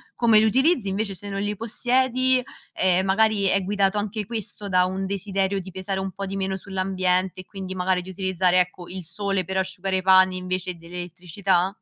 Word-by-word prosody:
come 225 -3 +5
li 220 - +4
utilizzi, 260 - +2
invece 200 +1 -2
se 200 +2 -7
non 195 0 -3
li 205 +1 -2
possiedi, 255 +3 +1 0.3
ehm, 185 0 +2
magari 205 +1 +2
è 195 0 +3
guidato 200 +1 +1
anche 210 +1 -3
questo 210 -1 -4
da 180 -2 +3
un 190 +1 -3
desiderio 195 0 -1
di 190 - -8
pesare 190 +1 -4
un 190 0 -3
po' 195 +2 -5
di 195 0 -5
meno 190 0 -2
sull'ambiente 185 -1 -1
e - - -17
quindi 190 -1 -7
magari 180 0 +1
di 185 - -11
utilizzare, 185 -1 +2
ecco, 180 -1 -4
il 185 0 -6
sole 195 +2 -1
per 190 +3 -3
asciugare 190 0 -1
i - - -1
panni 185 0 +5
invece 185 0 -3
dell'elettricità? 180 +2 -1
190 Hz, 195 wpm, -24 LUFS, 185-205 Hz, 0.3 s, come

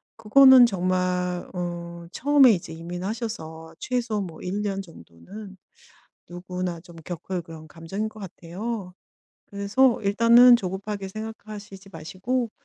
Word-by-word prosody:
그거는 255 +3 +7
정말 180 -2 -1
어 170 -1 -6
처음에 275 +2 +5
이제 170 -3 -5
이민하셔서 170 -1 -6
최소 235 -4 -2
뭐 170 -4 -8
1 200 +3 -3
년 195 -1 -2
정도는 190 - -13 0.7
누구나 180 -1 -5
좀 170 0 -15
겪을 175 0 -5
그런 160 -1 -12
감정일 175 +7 -5
것 215 0 -13
같아요. 185 +2 -6 0.5
그래서 210 +6 +1
일단은 235 +4 +6
조급하게 195 0 -5
생각하시지 210 -2 -9
마시고 200 +9 -3
190 Hz, 265 characters per minute, -24 LUFS, 175-220 Hz, 0.7 s, 그거는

